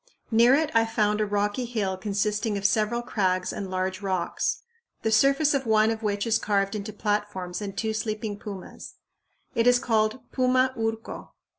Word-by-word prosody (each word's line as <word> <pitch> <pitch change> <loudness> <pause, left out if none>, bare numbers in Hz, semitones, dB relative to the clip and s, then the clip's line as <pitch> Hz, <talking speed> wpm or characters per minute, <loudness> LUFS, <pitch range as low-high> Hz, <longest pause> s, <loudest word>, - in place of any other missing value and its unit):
Near 235 +4 +6
it 310 +1 0
I 230 - +5
found 210 -1 +1
a 210 - +1
rocky 205 +4 -1
hill 210 -6 -2
consisting 210 +2 -1
of 200 - -5
several 215 +3 +2
crags 185 -5 0
and 195 -2 -5
large 185 +1 -2
rocks, 185 -3 -1 0.4
the 220 - +1
surface 275 +6 +4
of 270 -3 -1
one 220 0 +4
of 225 0 -4
which 205 -2 -1
is 225 -1 +2
carved 200 -1 0
into 210 0 -4
platforms 205 -3 -2
and 200 -1 -6
two 220 -1 -1
sleeping 215 -1 -3
pumas. 200 -4 -9 0.6
It 230 +1 +2
is 245 0 +6
called 220 0 0
Puma 255 0 +2
Urco. 225 0 -4
215 Hz, 170 wpm, -26 LUFS, 200-230 Hz, 0.6 s, Near